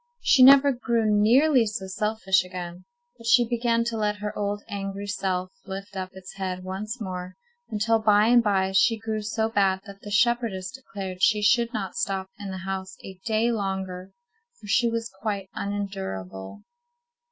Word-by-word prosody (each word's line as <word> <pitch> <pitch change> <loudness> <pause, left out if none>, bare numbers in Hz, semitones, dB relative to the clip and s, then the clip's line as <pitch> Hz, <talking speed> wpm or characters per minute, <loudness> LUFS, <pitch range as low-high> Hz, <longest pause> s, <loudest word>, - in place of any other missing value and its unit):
She 265 - +5
never 275 +2 +8
grew 235 -3 0
nearly 230 +5 +4
so 205 -2 -4
selfish 195 -1 +1
again, 180 -1 -8 0.3
but 230 - -9
she 240 0 +5
began 235 -1 +1
to 230 -1 -3
let 210 -1 0
her 210 0 -5 0.3
angry 195 0 -5
old 205 - -6
self 185 -2 -2 0.2
lift 195 +1 -7
up 185 -1 -4
its 190 -1 -11
head 185 -1 -3
once 210 +6 -5
more, 185 -3 -6 0.3
until 225 +1 +1
by 210 -1 +4
and 240 +1 +6
by 195 -3 +1
she 225 +4 +3
grew 220 -1 -3
so 220 +1 -1
bad 195 -3 +1
that 200 -1 -12
the 205 - -9
shepherdess 225 -4 +1
declared 195 -8 -7
she 210 0 +3
should 235 +2 +3
not 205 -6 -4
stop 190 0 -2
in 200 -1 -6
the 190 0 -6
house 190 0 -5
a 190 -1 -10
day 225 +2 +2
longer, 190 -3 -3 0.5
for - - -14
she 230 +3 +2
was 230 -1 -3
quite 200 -3 -3
unendurable. 190 - -5
205 Hz, 170 wpm, -25 LUFS, 190-225 Hz, 0.5 s, never